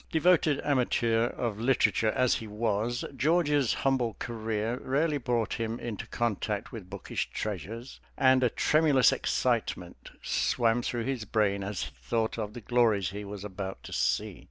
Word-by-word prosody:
Devoted 160 Hz, -3 st, +3 dB
amateur 120 Hz, -4 st, +2 dB
of 115 Hz, -4 st, -3 dB
literature 115 Hz, -2 st, +2 dB
as 125 Hz, -2 st, +3 dB
he 110 Hz, -, -7 dB
was, 110 Hz, +2 st, -1 dB
George's 145 Hz, -2 st, +2 dB
humble 125 Hz, -5 st, +1 dB
career 110 Hz, +1 st, -3 dB
rarely 145 Hz, +3 st, +1 dB
brought 120 Hz, -3 st, 0 dB
him 115 Hz, +1 st, -3 dB
into 115 Hz, -4 st, -5 dB
contact 110 Hz, -3 st, -2 dB
with 100 Hz, -6 st, -9 dB
bookish 100 Hz, 0 st, -4 dB
treasures, 110 Hz, -, -5 dB, 0.2 s
and 130 Hz, 0 st, +5 dB
a 125 Hz, -, +4 dB
tremulous 150 Hz, -1 st, +4 dB
excitement -, -, -1 dB
swam 115 Hz, -, +1 dB
through 120 Hz, -1 st, -2 dB
his 130 Hz, -2 st, -2 dB
brain 100 Hz, -2 st, +1 dB
as 100 Hz, 0 st, -3 dB
he -, -, -6 dB
thought 110 Hz, -, -1 dB
of 105 Hz, -1 st, -4 dB
the 120 Hz, -, -7 dB
glories 110 Hz, -5 st, +2 dB
he 105 Hz, +1 st, -6 dB
was 100 Hz, -1 st, -7 dB
about 95 Hz, -1 st, -6 dB
to -, -, -8 dB
see. -, -, 0 dB
115 Hz, 155 wpm, -29 LUFS, 105-130 Hz, 0.2 s, and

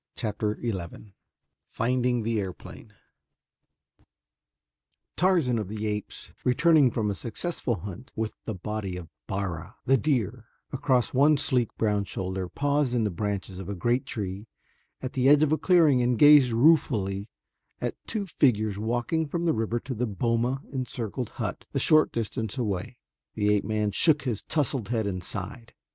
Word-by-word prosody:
Chapter 105 Hz, -1 st, -2 dB
XI 100 Hz, -2 st, -5 dB, 0.6 s
Finding 125 Hz, 0 st, 0 dB
the 115 Hz, 0 st, 0 dB
Airplane 95 Hz, -3 st, -7 dB, 2.2 s
Tarzan 160 Hz, -10 st, +2 dB
of 105 Hz, -, -3 dB
the 110 Hz, +2 st, -4 dB
Apes, 105 Hz, -1 st, -4 dB
returning 150 Hz, +2 st, +4 dB
from 110 Hz, -3 st, -1 dB
a -, -, -1 dB
successful 120 Hz, -, -3 dB
hunt, 100 Hz, +7 st, -9 dB
with 110 Hz, -1 st, -3 dB
the 110 Hz, -, -3 dB
body 100 Hz, -1 st, -4 dB
of 85 Hz, -3 st, -9 dB, 0.2 s
Bara, 95 Hz, 0 st, -4 dB
the 135 Hz, +1 st, +4 dB
deer, 120 Hz, -5 st, -1 dB, 0.3 s
across 130 Hz, -2 st, +1 dB
one 145 Hz, +3 st, +5 dB
sleek, 125 Hz, -4 st, +2 dB
brown 105 Hz, -2 st, +1 dB
shoulder, 95 Hz, 0 st, -4 dB
paused 145 Hz, -1 st, 0 dB
in 115 Hz, -, +2 dB
the 105 Hz, -, 0 dB
branches 100 Hz, 0 st, -3 dB
of 95 Hz, 0 st, -7 dB
a 100 Hz, -, -3 dB
great 120 Hz, +8 st, 0 dB
tree 100 Hz, 0 st, -5 dB, 0.6 s
at 130 Hz, -, -4 dB
the 130 Hz, 0 st, +3 dB
edge 145 Hz, +1 st, +6 dB
of 155 Hz, -, +2 dB
a 155 Hz, -, +3 dB
clearing 160 Hz, -8 st, +4 dB
and 120 Hz, -1 st, +1 dB
gazed 145 Hz, -2 st, +8 dB
ruefully 115 Hz, -7 st, +2 dB, 0.5 s
at -, -, -2 dB
two 215 Hz, -3 st, -2 dB
figures 110 Hz, -, +1 dB
walking 120 Hz, +8 st, -1 dB
from 170 Hz, +4 st, -2 dB
the 165 Hz, -, +3 dB
river 115 Hz, +1 st, -1 dB
to 130 Hz, -, -5 dB
the 125 Hz, +1 st, -1 dB
boma 115 Hz, +5 st, 0 dB
encircled 125 Hz, -2 st, -4 dB
hut -, -, -5 dB
a -, -, +2 dB
short 155 Hz, -1 st, +4 dB
distance 110 Hz, 0 st, -3 dB
away. 110 Hz, 0 st, -3 dB, 0.4 s
The 105 Hz, -1 st, +2 dB
ape 105 Hz, -, +1 dB
man 105 Hz, -1 st, 0 dB
shook 150 Hz, -, +3 dB
his 120 Hz, -6 st, -2 dB
tousled 135 Hz, -7 st, -1 dB
head 115 Hz, -3 st, 0 dB
and 95 Hz, -3 st, -3 dB
sighed. 115 Hz, +6 st, -6 dB
115 Hz, 155 wpm, -27 LUFS, 105-130 Hz, 2.2 s, gazed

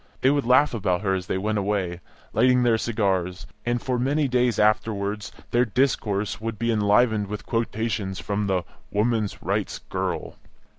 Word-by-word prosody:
They 130 Hz, -, +5 dB
would 145 Hz, -2 st, +1 dB
laugh 130 Hz, +3 st, +5 dB
about 90 Hz, -5 st, 0 dB
her 95 Hz, -2 st, +1 dB
as 90 Hz, -1 st, -2 dB
they -, -, -1 dB
went 105 Hz, +2 st, 0 dB
away, 95 Hz, -3 st, -1 dB, 0.3 s
lighting 125 Hz, +2 st, +4 dB
their 115 Hz, -2 st, +3 dB
cigars, 95 Hz, -6 st, -1 dB, 0.2 s
and 120 Hz, 0 st, +1 dB
for 125 Hz, 0 st, -1 dB
many 140 Hz, +3 st, +1 dB
days 125 Hz, -3 st, +2 dB
afterwards 105 Hz, -1 st, +1 dB, 0.2 s
their 120 Hz, +1 st, +4 dB
discourse 105 Hz, -5 st, 0 dB
would 115 Hz, -1 st, -3 dB
be 115 Hz, +1 st, 0 dB
enlivened 105 Hz, 0 st, +3 dB
with 105 Hz, +1 st, -6 dB
quotations 110 Hz, -4 st, -2 dB
from 105 Hz, 0 st, -2 dB
the 95 Hz, -2 st, +1 dB, 0.3 s
"women's 110 Hz, 0 st, 0 dB
rights -, -, -1 dB
girl." -, -, -4 dB
110 Hz, 160 wpm, -25 LUFS, 100-120 Hz, 0.3 s, They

